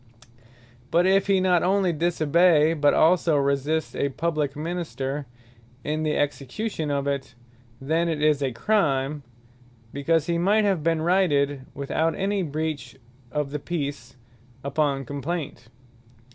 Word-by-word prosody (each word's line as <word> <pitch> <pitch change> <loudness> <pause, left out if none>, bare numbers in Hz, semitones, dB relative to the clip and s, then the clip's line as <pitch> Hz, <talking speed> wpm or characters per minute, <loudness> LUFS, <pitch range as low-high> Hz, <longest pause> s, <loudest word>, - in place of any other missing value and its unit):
But 175 +2 +3
if 195 +1 +3
he 195 -1 +3
not 180 -2 +3
onely 190 -1 +2
disobey, 165 0 +3
but 145 -2 +3
also 165 -2 +4
resist 140 +3 0
a 140 - 0
publique 150 -1 -2
Minister 150 -4 -4 0.6
in 155 +1 -2
the 155 -1 0
execution 145 - -2
of 140 -1 -1
it, 140 -2 -3 0.4
then 160 +5 0
it 160 -2 -2
is 150 -1 +2
a 135 -2 0
Crime; 145 - 0 0.7
because 155 +3 +1
he 170 0 0
might 205 +4 +3
have 195 -5 +1
been 165 0 0
righted, 145 -7 +1
(without 155 +3 -1
any 200 +1 -1
breach 155 -5 -4 0.4
of 150 -1 -2
the 150 - -3
Peace,) 140 -6 -5 0.5
upon 140 -1 0
complaint. 145 0 -5
155 Hz, 130 wpm, -25 LUFS, 140-170 Hz, 0.7 s, also